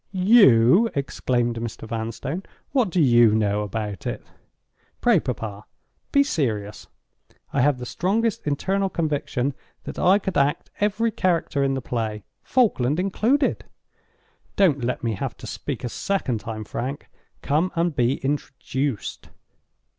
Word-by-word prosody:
"You!" 185 - +6
exclaimed 125 -3 -1
Mr. 115 -1 -6
Vanstone. 115 - -4 0.3
"What 250 -8 +2
do 180 - 0
you 120 -6 +5
know 105 -1 +1
about 105 -2 -4
it?" - - -4 0.7
"Pray, 235 -7 +4
papa, 110 -6 -5 0.5
be 280 - +5
serious! 110 - -2 0.7
I - - +2
have 145 0 +3
the 125 - -6
strongest 205 - -1
internal 195 +7 0
conviction 145 -5 -1 0.3
that - - -7
I 190 +2 +5
could 190 -6 -1
act 140 +1 0
every 210 +3 +1
character 170 -8 0
in 135 0 +1
the 130 - -4
play—Falkland 120 - 0
included. 230 +9 +1 0.9
Don't 155 -10 +3
let 125 +1 -2
me 115 -2 0
have 95 - -4
to - - -10
speak - - -5
a 120 - -2
second 135 - -1
time, 110 -1 -6
Frank. 130 +6 -5 0.4
Come 155 +6 +1
and 170 -2 0
be 125 0 +2
introduced." 135 -3 -3
140 Hz, 130 wpm, -24 LUFS, 115-185 Hz, 0.9 s, You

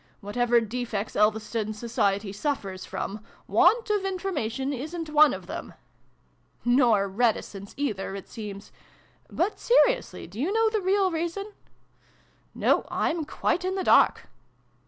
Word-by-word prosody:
Whatever 240 +4 +2
defects 225 -2 -4
Elves 215 +1 +2
ton 215 -2 -2
society 205 -3 -1
suffers 200 -6 -3
from, 210 +1 -5 0.2
want 415 - +3
of 415 -2 +1
information 290 - -2
isn't 310 +4 -5
one 305 0 +6
of - - -6
them! - - -7 0.5
" - - -40
"Nor 240 -5 +4
reticence, 200 -2 -1
either, 205 -9 -2
it 195 - -8
seems. 205 -2 -8 0.6
But, 395 +4 -1
se 480 - +2
riously, - - -4
do 195 +6 -10
you 315 +9 0
know 450 +1 +2
the 430 -2 0
real 380 0 +2
reason? 345 +6 -3 0.3
" - - -35
" - - -37
No, - - +3
I'm 325 -2 -1
quite 355 - -1
in 375 +1 -1
the 380 - -1
dark." - - +4
245 Hz, 150 wpm, -26 LUFS, -, 0.6 s, one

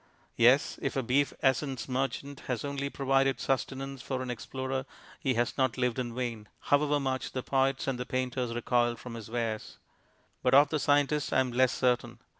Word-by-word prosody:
Yes, 125 +5 +4
if 140 - -2
a 135 - 0
Beef 135 +4 +2
Essence 130 -2 +1
Merchant 135 +2 -2
has 125 0 -2
only 140 0 -2
provided 135 -1 +1
sustenance 135 0 -2
for 130 -1 -3
an 125 - -3
Explorer 130 +2 -4 0.3
he 130 -3 0
has 120 +2 0
not 130 -2 +2
lived 125 -1 0
in 120 -2 -3
vain, 115 -4 -3
however 145 0 +2
much 130 -1 -2
the 130 - -3
poets 135 0 +1
and 135 -2 -2
the 125 - -3
painters 125 -2 -2
recoil 120 0 +1
from 120 +1 -9
his 115 -2 -8
wares. 115 -2 -3 0.6
But 125 - +4
of 145 +1 +7
the 155 - 0
scientist 145 +1 +2
I - - +4
am 130 -1 -2
less 130 +1 +3
certain. 125 -2 0
130 Hz, 185 wpm, -30 LUFS, 125-135 Hz, 0.6 s, of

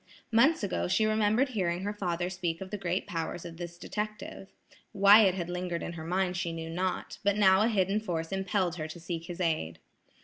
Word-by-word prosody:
Months 255 +6 +4
ago 200 - -1
she 215 +4 +2
remembered 215 +4 +2
hearing 185 -6 -1
her 205 +1 -2
father 175 -3 -2
speak 175 -2 -3
of 190 0 -8
the 210 - -3
great 180 0 -1
powers 165 0 -4
of 165 -1 -8
this 175 0 -7
detective. 210 0 -5 0.5
Why 200 +2 +8
it 185 -1 +2
had 175 -3 -3
lingered 180 -1 -3
in 170 - -5
her 160 -2 -7
mind 180 +1 0
she 170 -1 -2
knew 165 0 -6
not, 185 +2 -3
but 205 0 +2
now 190 -1 +5
a 220 - +4
hidden 200 -2 +1
force 165 -6 -3
impelled 190 -2 -1
her 155 -1 -4
to 160 +2 -9
seek 165 0 -5
his 175 0 -7
aid. 155 - -1
185 Hz, 210 wpm, -29 LUFS, 170-205 Hz, 0.5 s, Why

